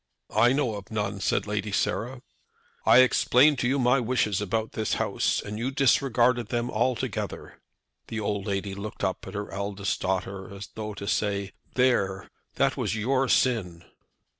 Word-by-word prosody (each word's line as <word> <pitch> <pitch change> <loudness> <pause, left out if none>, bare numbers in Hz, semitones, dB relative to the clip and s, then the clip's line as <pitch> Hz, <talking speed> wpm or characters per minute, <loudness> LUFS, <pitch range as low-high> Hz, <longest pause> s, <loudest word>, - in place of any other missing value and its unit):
"I 120 - +5
know 130 -6 0
of 100 - -10
none," 105 -2 -2
said - - 0
Lady 105 0 -2
Sarah. 125 +5 -1 0.6
"I 130 - +8
explained 130 +2 +4
to 120 - +1
you 135 +3 +1
my 125 +1 +3
wishes 110 -5 0
about 110 +2 -1
this 110 - -1
house, - - 0
and 105 +1 -6
you 120 +3 -1
disregarded 125 -3 +2
them 120 +2 -2
altogether." 120 +2 -2 0.5
The 110 - -4
old 100 -1 -2
lady 100 0 -2
looked 100 +2 -7
up - - -2
at - - -8
her 100 0 -4
eldest 100 0 -3
daughter 95 +1 -3
as 100 -1 -8
though 105 -1 -5
to 100 - -7
say, 100 -2 -1 0.2
"There, 100 -7 +1 0.2
that - - +2
was - - -1
your 130 +4 +1
sin." 95 -10 +1
110 Hz, 165 wpm, -26 LUFS, 100-125 Hz, 0.6 s, I